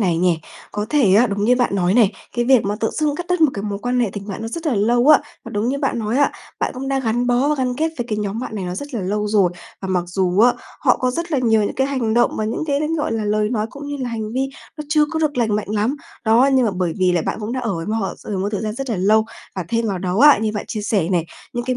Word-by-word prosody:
này 175 -5 +1
nhè. 175 -2 +3 0.4
Có 210 +1 -2
thể 260 -11 +4
á, 230 +5 +6
đúng 205 -1 -2
như 250 +2 +4
bạn 245 -5 +1
nói 185 +1 +2
này, 220 -4 +4 0.2
cái 240 - +2
việc 260 -2 +4
mà 205 +1 -1
tự 225 - +1
dưng 300 -2 0
cắt 350 - -5
đứt 360 -1 +1
một 310 -3 +5
cái 200 - -4
mối 205 -1 -3
quan 245 +3 0
hệ 230 -5 +1
tình 205 0 -7
bạn 195 - -5
nó 225 - -3
rất 330 +6 -5
là 275 - +2
lâu 240 +6 +2
á, 305 - +9 0.3
và - - -8
đúng 210 +3 -1
như 280 +2 -1
bạn 275 -4 -1
nói 220 +3 -1
á, 285 - +3 0.3
bạn - - 0
cũng 270 +1 -5
đã 275 0 +1
gắn 240 0 0
bó 245 +4 +2
và 300 - +2
gắn 255 -3 -1
kết 320 +2 0
với 240 - -2
cái 215 -1 -1
nhóm 210 +2 -3
bạn 245 - -5
này 195 - -3
nó 180 0 -4
rất 285 +4 -7
là 225 - -1
lâu 210 +3 -1
rồi, 200 -4 +3 0.3
và 190 - -4
mặc 180 -2 0
dù 180 +1 +1
á, 245 +2 +6 0.3
họ - - +4
có 255 0 0
rất 335 +5 -4
là 280 - +2
nhiều 225 -4 +3
những - - -2
cái 265 +1 +1
hành 250 -6 -1
động 240 - +2
và 215 - -1
những 225 +8 -2
cái 285 0 0
l 320 +2 -1
gọi 295 - -1
là, 220 -1 -1
lời 210 0 +1
nói 220 -3 0
cũng 285 +1 -9
như 290 0 -4
là 255 -3 -3
hành 220 -1 -4
vi 265 +2 0 0.3
nó 300 - -6
chưa 300 0 +4
có 320 - -2
được 300 -4 0
lành 220 -3 +2
mạnh 210 - -4
lắm. 215 +7 0 0.3
Đó, 235 +5 +5
nhưng 260 -2 +4
mà - - +1
bởi 180 -3 -1
vì 185 -1 +3
là 170 -3 +1
bạn - - -3
cũng 215 +2 -4
đã 255 - -2
ở 225 -6 -2
với 165 0 -5
m - - -3
họ, 220 -4 -1
ờ, 205 - -3
một 195 +2 -1
thời 205 - -1
gian 215 0 -3
rất 270 0 -4
là 220 - 0
lâu, 215 +4 +3 0.3
và 185 - -2
thêm 230 -1 0
vào 195 -3 -2
đó 185 +2 -2
á, 295 0 +8
như 215 0 -1
bạn 210 - -4
chia 215 - -3
sẻ 195 -5 0
này, 175 -3 0 0.3
những 240 0 -3
cái 255 0 -1
225 Hz, 325 wpm, -20 LUFS, 205-260 Hz, 0.4 s, á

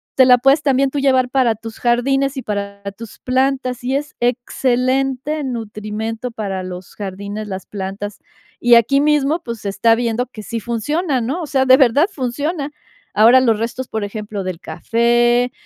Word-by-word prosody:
te 260 - +6
la 250 -1 +7
puedes 270 +4 +4
también 275 -1 +2
tú 285 - -2
llevar 260 -2 +3
para 250 -4 +2
tus 225 +1 -10
jardines 270 +3 +1
y 260 - -4
para 200 -1 -4
tus 230 -2 -10
plantas, 255 -1 0
y 260 +2 -1
es 295 +1 -3
excelente 255 +4 0
nutrimento 225 -1 -4
para 195 -4 -4
los 180 0 -8
jardines, 200 +2 -6
las 190 -1 -6
plantas. 200 +1 -6 0.4
Y 240 0 +6
aquí 255 +5 +4
mismo, 300 +2 +2
pues, 235 -2 -6
se 200 - -3
está 225 +4 +3
viendo 240 +1 -1
que 215 -4 -10
sí 230 +2 -4
funciona, 275 - -1
¿no?, 275 +10 -2
o 315 - -5
sea, 265 -2 +1
de 260 0 +7
verdad 270 +4 +4
funciona. 285 +4 -3 0.5
Ahora 235 +5 +7
los 230 -4 +3
restos, 245 +3 -3
por 220 -1 -3
ejemplo, 205 -1 -5
del 185 -2 -5
café, 240 +8 +1
240 Hz, 170 wpm, -18 LUFS, 215-270 Hz, 0.5 s, la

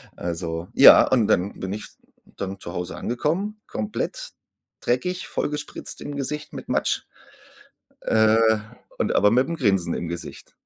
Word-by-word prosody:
also 85 0 -4
ja, 135 - +9
und 120 -5 +3
dann 95 +3 +1
bin 95 - -4
ich 105 - -6 0.4
dann 95 0 -6
zu 85 - -7
Hause 90 0 -4
angekommen, 180 - -2
komplett - - -4 0.5
dreckig, 180 +10 -1
vollgespritzt 150 0 -4
im 145 - -6
Gesicht 150 +2 -4
mit - - -8
Matsch, - - 0 1.0
äh, 110 0 +4 0.6
und - - 0
aber 105 - +5
mit'm 130 +9 +2
Grinsen 95 - +1
im 85 - -3
Gesicht. 85 +1 -7
110 Hz, 135 wpm, -24 LUFS, 95-150 Hz, 1.0 s, ja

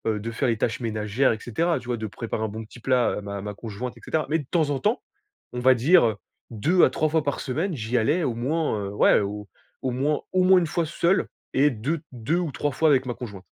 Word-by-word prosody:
heu, - - -3
de 115 +3 -5
faire 120 +3 0
les 115 - 0
tâches 115 +3 -1
ménagères, 110 +3 +1
et 110 - -3
cetera, 165 +11 0
tu - - -14
vois 120 -1 -1
de 110 - -4
préparer 110 +1 -4
un - - 0
bon 110 +2 -6
petit 110 +2 -14
plat 125 0 +2
à - - -4
ma 100 0 -5
ma 105 +1 -5
conjointe 115 +3 -6
et - - -16
cetera. 155 -1 -1
Mais 160 - +2
de 145 - -7
temps 160 -4 +1
en 145 - 0
temps, 215 - 0 0.5
on 125 - -3
va 130 +1 +6
dire, 140 +7 +5
heu, 110 -2 +1 0.4
2 155 - +2
à - - +6
3 155 - 0
fois 160 0 +1
par 140 -1 -2
semaine, 160 +7 -2
j'y 120 0 -1
allais 145 +10 +2
au 125 -6 -1
moins, 145 +2 0
heu, - - -4
ouais, - - +5
au 105 +1 -5 0.3
au 130 - -1
moins 140 +4 0
au 185 0 +3
moins 185 0 +6
une 170 - -1
fois 170 +1 -1
seul 170 +3 +1 0.3
et 145 +2 +4
de 135 +8 -2
deux 125 +7 -1
ou 175 -4 -1
3 145 +2 -2
fois 160 +4 +2
avec 130 -3 +3
ma 120 - -1
conjointe. 100 -6 -8
130 Hz, 265 wpm, -25 LUFS, 110-155 Hz, 0.5 s, va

